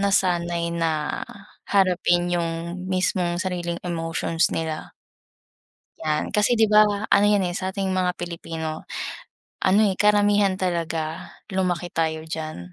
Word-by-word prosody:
nasanay 175 -3 +1
na 160 -3 -1 0.5
harapin 175 -2 +2
yung 170 +1 -2
mismong 185 -2 0
sariling 175 -2 -2
emotions 165 -1 0
nila. 160 -1 -4 1.1
'Yan 155 -1 -1
kasi 210 +4 +3
'di 225 -1 +4
ba, 215 0 +7 0.2
ano 200 - +5
yan, 205 -2 +4
eh, 175 - -4
sa'ting 190 0 -2
mga 185 -1 +1
Pilipino 165 -2 -5 0.8
ano, 190 +3 +5
eh, 190 - 0
karamihan 205 -2 +4
talaga 165 -3 -2 0.2
lumaki 180 -2 0
tayo 160 -1 -1
diyan. 155 -1 -5
175 Hz, 120 wpm, -24 LUFS, 165-190 Hz, 1.1 s, ba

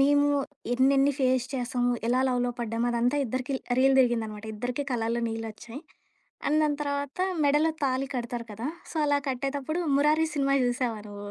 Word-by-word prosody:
మేము 285 +1 +4 0.5
ఎన్నెన్ని 275 +2 +4
ఫేస్ 255 -1 +2
చేసాం, 245 -1 -1 0.2
ఎలా 250 +1 +3
లవ్‌లో 245 -1 0
పడ్డాం 230 +1 -1
అదంతా 240 +3 +1
ఇద్దరికి 255 +3 -3
ల్ - - -29 0.2
రీల్ 270 0 +5
తిరిగిందనమాట. 220 -4 0
ఇద్దరికీ 245 +6 -3
కలలో 235 0 -1
నీళ్ళోచ్చాయి. 225 +3 -6 0.7
అండ్ 305 +2 +3
దాని 295 -1 +1
తర్వాత 285 +1 -3 0.3
మెడలో 295 +3 +3
తాళి 265 0 0
కడతారు 235 -1 -4
కదా! 225 +7 -4 0.2
సో, - - -8
అలా 285 0 +2
కట్టేటప్పుడు 275 +5 -2 0.2
'మురారి' 305 +3 +3
సినిమా 275 0 +2
చూశావా 245 -3 -1
నువ్వు? 205 0 -8
255 Hz, 155 wpm, -27 LUFS, 235-280 Hz, 0.7 s, రీల్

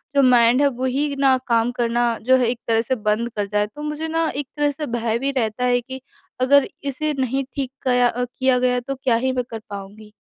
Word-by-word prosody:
जो 280 - +5
माइंड 245 +1 +5
है 285 - +5
वही 280 +3 0
न 265 -2 +4
काम 230 0 +2
करना 240 0 0 0.2
जो 260 +2 +5
है 245 -2 +1
एक 240 - -5
तरह 225 0 +3
से 260 +3 -1
बंद 215 +2 -1
कर 205 -1 -1
जाए। 210 +1 0
तो 295 +8 -12
मुझे 300 +1 -3
न 325 -1 +1
एक 285 -2 -3
तरह 290 0 +2
से 300 +2 -5
भय 230 0 -1
भी 275 +1 -1
रहता 225 +1 -1
है 245 0 +2
कि 260 +1 -9 0.4
अगर 280 +2 +5 0.2
इसे 295 +2 -2
नहीं 265 +1 0
ठीक 270 -2 -3
कया 250 -1 +3
अ, 245 +1 -2
किया 255 +1 +1
गया 250 0 +2
तो 275 +3 -5
क्या 245 -3 +3
ही 260 +3 0
मैं 250 -1 -1
कर 225 - -5
पाऊँगी। 205 +2 -9
250 Hz, 235 wpm, -21 LUFS, 230-275 Hz, 0.4 s, जो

